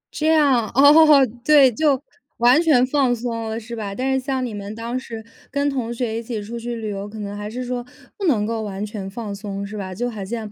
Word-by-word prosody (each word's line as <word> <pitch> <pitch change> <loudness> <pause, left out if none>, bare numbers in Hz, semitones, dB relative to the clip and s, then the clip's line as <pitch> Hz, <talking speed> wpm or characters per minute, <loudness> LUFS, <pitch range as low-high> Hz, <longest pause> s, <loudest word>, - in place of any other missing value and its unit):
这 310 - 0
样， 280 -8 +3
哦， 290 +1 +7 0.2
对， 285 -2 +6
就 280 +3 +2 0.4
完 245 +6 +5
全 290 -7 +4
放 260 -2 +1
松 230 -1 -4
了， 220 +1 -3
是 235 +1 -8
吧？ 205 -3 -5
但 265 +3 -1
是 265 - +2
像 265 -1 -1
你 235 - -5
们 205 0 -6
当 230 +2 -4
时 225 -4 -9 0.2
跟 285 +1 0
同 245 -4 -3
学 230 -2 -2
一 - - -5
起 230 -1 -5
出 235 +3 -6
去 240 +1 -4
旅 220 -2 -5
游， 200 0 -5
可 220 - -10
能 205 -1 -5
还 205 0 -5
是 250 +3 -5
说 245 0 -3 0.3
不 405 - -4
能 230 - +2
够 225 0 -2
完 205 -1 -4
全 205 -2 -6
放 210 0 -6
松， 200 -1 -5
是 205 +2 -8
吧？ 195 -2 -5
就 245 +6 -2
好 210 -3 -6
像 215 +1 -5
235 Hz, 255 characters per minute, -21 LUFS, 210-265 Hz, 0.4 s, 哦